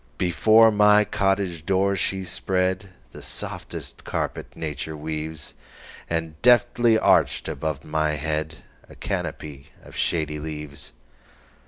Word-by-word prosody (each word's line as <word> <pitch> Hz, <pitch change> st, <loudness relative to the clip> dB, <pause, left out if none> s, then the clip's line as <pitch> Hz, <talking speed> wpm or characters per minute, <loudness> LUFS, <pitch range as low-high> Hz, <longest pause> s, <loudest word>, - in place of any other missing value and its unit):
Before 110 Hz, +6 st, +5 dB
my 105 Hz, 0 st, +5 dB
cottage 95 Hz, -5 st, 0 dB
door 95 Hz, +2 st, +2 dB
she 95 Hz, +1 st, -1 dB
spreadThe 95 Hz, 0 st, -2 dB
softest -, -, -6 dB
carpet -, -, -4 dB
nature 75 Hz, 0 st, -5 dB
weaves, 75 Hz, 0 st, -5 dB, 0.6 s
And 80 Hz, -1 st, -3 dB
deftly 120 Hz, -1 st, +5 dB
arched -, -, +3 dB
above 75 Hz, -3 st, -3 dB
my 75 Hz, 0 st, 0 dB
headA 80 Hz, +1 st, -2 dB, 0.4 s
canopy 70 Hz, -2 st, -4 dB, 0.2 s
of -, -, -14 dB
shady 75 Hz, -2 st, -1 dB
leaves. 75 Hz, -3 st, -7 dB
80 Hz, 105 wpm, -24 LUFS, 75-100 Hz, 0.6 s, Before